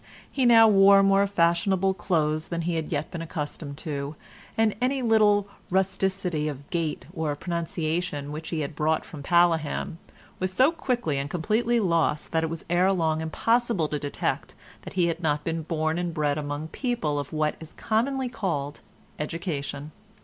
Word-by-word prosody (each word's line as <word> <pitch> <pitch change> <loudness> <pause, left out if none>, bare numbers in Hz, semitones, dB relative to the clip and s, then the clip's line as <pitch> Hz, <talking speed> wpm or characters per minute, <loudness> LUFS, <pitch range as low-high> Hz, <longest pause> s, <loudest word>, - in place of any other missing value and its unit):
He 260 -3 +2
now 225 -1 +8
wore 195 -1 +7
more 195 0 +4
fashionable 190 +1 +2
clothes 155 -4 0
than 170 -1 -3
he 175 +1 -1
had 160 -2 -3
yet - - -2
been 170 - -5
accustomed 150 -2 -5
to, 145 -1 -3 0.4
and 220 -1 +3
any 260 +1 +1
little 210 -3 +4 0.2
rusticity 185 -4 0
of 145 -1 -6
gait 165 -3 -2
or 160 -4 -2
pronunciation 165 -2 -3
which 155 +2 -6
he 160 -2 -2
had 145 0 -4
brought 155 +1 +1
from 155 -4 -9
Paleham, 165 0 +1 0.4
was 185 0 -1
so 260 - +4
quickly 240 - -1
and 140 +1 -3
completely 225 +8 +1
lost 170 -6 +1
that 160 -1 +1
it 160 - -1
was 165 0 -6
ere 180 +3 +3
long 160 -4 +1
impossible 225 +2 +1
to 150 - -2
detect 145 0 -3 0.3
that - - -9
he 180 -2 +2
had 170 0 -1
not 150 -2 0
been 165 0 -2
born 160 +1 -1
and 175 -2 -3
bred 150 -2 +1
among 145 +1 -4
people 165 - -1
of 145 - -5
what 155 -1 0
is 160 -1 -11
commonly 255 +4 0
called 170 - -3 0.4
education. 150 -2 -4
170 Hz, 170 wpm, -26 LUFS, 155-195 Hz, 0.4 s, now